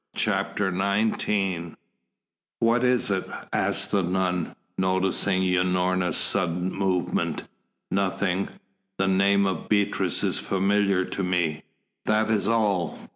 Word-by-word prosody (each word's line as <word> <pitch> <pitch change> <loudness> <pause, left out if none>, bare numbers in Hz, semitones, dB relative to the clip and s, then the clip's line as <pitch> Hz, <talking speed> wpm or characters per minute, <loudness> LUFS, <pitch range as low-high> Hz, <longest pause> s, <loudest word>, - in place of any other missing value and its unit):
CHAPTER 95 -3 0
XIX 100 -3 0 0.8
"What 115 +2 +3
is 125 -4 +2
it?" 95 -1 -1 0.2
asked - - 0
the 100 - +3
nun, 90 -1 -1 0.2
noticing 95 0 +1
Unorna's 90 0 +1
sudden 90 -1 0
movement. 95 -2 -1 0.5
"Nothing; 95 -1 0 0.5
the 95 - +1
name 100 +1 +3
of 95 -3 -3
Beatrice 100 -1 +1
is - - +1
familiar 100 -1 +1
to 100 - -4
me, 90 -4 0 0.5
that 110 +1 +2
is 105 -2 +1
all. 105 -6 +1
95 Hz, 110 wpm, -25 LUFS, 90-100 Hz, 0.8 s, What